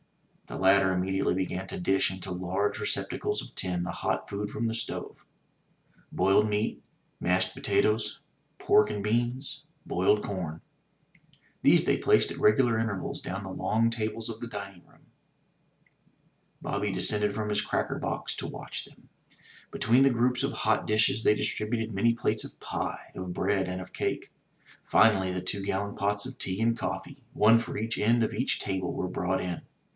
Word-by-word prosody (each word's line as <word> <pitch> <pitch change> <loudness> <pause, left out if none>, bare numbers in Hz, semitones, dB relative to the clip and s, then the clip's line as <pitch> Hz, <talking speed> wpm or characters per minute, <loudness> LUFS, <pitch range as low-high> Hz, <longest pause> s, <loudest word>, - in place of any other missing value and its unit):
The - - -6
latter 95 0 +4
immediately 95 0 0
began 95 0 -2
to - - -6
dish 95 +1 +2
into 95 0 -7
large 95 +3 -1
recep - - -1
tacles - - -2
of - - -12
tin 90 -2 -2
the 90 - -3
hot - - 0
food 105 +1 -3
from 115 +2 -3
the 115 - -1
stove 115 - -5 0.5
— - - -30
^boiled 95 +3 +3
meat, 105 +1 -1 0.4
mashed 90 +2 +1
potatoes, 110 +1 +1 0.4
pork 105 - +4
and 105 -1 -3
beans, 120 +5 -1 0.2
boiled 100 +4 +2
com. 85 -5 -4 1.0
These - - +5
they - - +3
placed - - +3
at - - -7
regular 115 +2 +4
intervals 105 -4 -3
down 95 +3 -5
the 95 - -6
long 115 +4 +1
tables 110 0 -3
of 115 -1 -7
the 120 - -4
dining 100 -5 -8
room. - - -24 1.6
Bobby 100 0 -1
descended 105 +2 +3
from 110 -1 -2
his 105 0 +1
cracker - - -1
box - - -3
to - - -4
watch - - -5
them. - - -19 0.6
Between 120 +4 +3
the 135 - +6
groups 125 +1 +1
of 140 - 0
hot 110 -5 +1
dishes 110 +1 +3
they 105 - +5
distributed 110 +1 -1
many 115 +4 +3
plates 120 - 0
of - - -10
pie, - - -4
of 90 -1 -5
bread 95 -1 0
and 90 0 -3
of 95 0 -9
cake. - - -3 0.5
Finally 95 -4 +4
the 90 0 -3
two 95 +2 -4
gallon 100 +1 -2
pots 100 +1 0
of 130 0 -8
tea 95 +1 -1
and 115 +1 +2
coffee, 95 +10 -5
one 110 +2 +6
for 115 - -5
each 115 +1 -2
end 115 +3 +3
of - - -1
each 125 +5 0
table, 95 -2 -2
were 90 - -3
brought 90 +1 -1
in. 90 -2 -4
105 Hz, 175 wpm, -28 LUFS, 95-115 Hz, 1.6 s, the